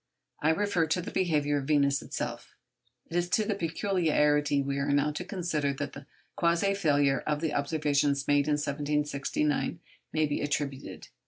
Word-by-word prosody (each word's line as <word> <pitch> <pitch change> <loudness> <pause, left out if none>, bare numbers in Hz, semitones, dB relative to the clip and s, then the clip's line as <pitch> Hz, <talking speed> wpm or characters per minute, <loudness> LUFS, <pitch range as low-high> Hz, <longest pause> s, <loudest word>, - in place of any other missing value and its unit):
I 155 - +3
refer 170 -1 +1
to 160 - +1
the 180 - -5
behaviour 150 -5 +1
of 135 - -6
Venus 140 -2 +3
herself. - - -6 0.6
It - - -4
is 175 0 +1
to 215 +4 +2
the 210 - 0
peculiarity 160 -5 +1
we 140 0 -1
are 140 +1 -1
now 145 +1 +2
to 150 +4 -5
consider 165 -7 -1
that 145 0 -5
the 140 0 -10 0.3
quasi 170 +3 +2
failure 145 -7 +2
of 150 -1 +1
the 160 0 -1
observations 145 -1 +1
made 145 0 +3
in 150 - +2
1769 145 +1 -1 0.3
must 155 -1 +1
be 145 - -1
attributed. 145 -2 -3
150 Hz, 165 wpm, -29 LUFS, 145-165 Hz, 0.6 s, I